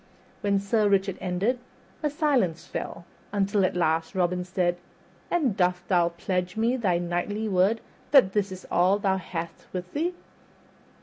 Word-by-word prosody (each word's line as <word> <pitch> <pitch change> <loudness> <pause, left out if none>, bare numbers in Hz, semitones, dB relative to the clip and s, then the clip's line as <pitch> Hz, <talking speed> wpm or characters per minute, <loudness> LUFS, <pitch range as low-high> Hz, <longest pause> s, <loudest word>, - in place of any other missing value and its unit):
When 200 -1 +2
Sir 205 +1 +2
Richard 195 -1 +2
ended 195 +7 0 0.4
a 300 - +1
silence 275 - +1
fell, - - -6 0.3
until 200 0 +1
at 185 - +1
last 165 +1 +1
Robin 180 0 +1
said, 180 -1 0 0.5
"And 285 - +1
dost 180 -1 +1
thou 175 -3 +4
pledge 180 +2 -2
me 230 +3 +2
thy 195 -9 +1
knightly 175 +5 -2
word 200 +3 +2 0.3
that 260 -10 +6
this 205 -2 0
is 185 0 -8
all 185 +3 +4
thou 195 -2 +1
hast 170 -2 -6
with 180 0 -5
thee?" 345 +4 -1
190 Hz, 150 wpm, -26 LUFS, 180-215 Hz, 0.5 s, that